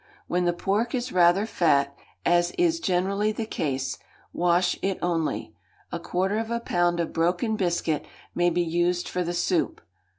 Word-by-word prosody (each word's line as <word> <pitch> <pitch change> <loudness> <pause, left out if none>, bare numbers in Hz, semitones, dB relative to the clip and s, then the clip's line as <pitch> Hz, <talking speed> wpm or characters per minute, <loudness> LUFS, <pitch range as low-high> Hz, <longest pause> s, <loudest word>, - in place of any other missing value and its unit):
When 180 0 0
the 175 - +3
pork 205 +7 0
is 250 0 -3
rather 180 +3 +4
fat, 140 -9 +2 0.3
as 175 0 +3
is 335 -1 +2
generally 200 - +1
the 220 +1 -3
case, 135 -9 -2 0.3
wash 175 +1 +2
it 195 -1 0
only; 170 -3 -1 0.4
a - - -3
quarter 190 +4 -1
of 225 0 -3
a 235 0 -1
pound 175 -6 +1
of 170 - -2
broken 180 +7 +1
biscuit 170 -5 -1 0.3
may 175 0 +3
be 175 +1 +1
used 175 +1 0
for 180 - -1
the 175 0 -3
soup. 175 0 0
175 Hz, 165 wpm, -26 LUFS, 170-200 Hz, 0.4 s, rather